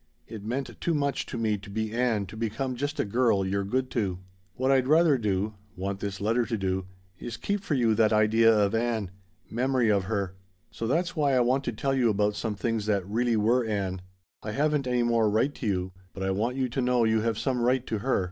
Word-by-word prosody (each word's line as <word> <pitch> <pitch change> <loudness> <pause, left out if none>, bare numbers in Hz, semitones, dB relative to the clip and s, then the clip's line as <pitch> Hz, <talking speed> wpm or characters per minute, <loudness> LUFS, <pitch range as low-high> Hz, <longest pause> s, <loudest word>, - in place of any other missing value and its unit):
It 110 -3 -8
meant 125 +5 -4
too 170 - +1
much 140 -2 -1
to - - -5
me 110 -3 0
to 100 +1 -12
be 110 +1 -3
Ann 115 -4 +1
to 95 - -11
become 115 +4 -2
just 145 +4 -3
a - - +2
girl 105 -2 +2
you're 100 +1 -1
good 130 +6 -1
to. 100 -6 -1 0.4
"What 130 +1 +1
I'd 130 -1 +3
rather 160 0 +5
do 105 -3 -1 0.2
want 95 +1 -3
this 100 -1 -4
letter 115 +4 +1
to 115 -1 -2
do 95 -1 -2 0.3
is 120 - -6
keep 205 0 -2
for 155 - -1
you 115 -4 +3
that 110 0 +3
idea 110 +1 +5
of 105 -2 +2
Ann 115 -4 -1 0.4
memory 125 0 +1
of 100 -2 +1
her. 100 -3 -2 0.4
"So 115 - -4
that's 170 +7 0
why 145 -4 +2
I - - +4
want 130 +3 +2
to - - -1
tell 135 +5 -1
you 125 -3 +3
about 105 0 +1
some 110 -2 -3
things 110 0 -2
that 100 -3 0
really 115 +2 +1
were 115 +4 +3
Ann. 100 -4 -2 0.4
I 105 - -5
haven't 150 0 +1
any 125 -1 +1
more 115 -2 +2
right 115 +7 +1
to 120 - -5
you, 95 -2 -1 0.2
but 95 - -4
I 95 - 0
want 110 +6 -1
you 130 -1 +1
to 125 +2 -2
know 125 -1 +2
you 110 -1 +2
have 115 -1 0
some 130 -1 -1
right 125 +1 +2
to 110 - -2
her. 130 +5 +1
115 Hz, 235 wpm, -27 LUFS, 105-130 Hz, 0.4 s, rather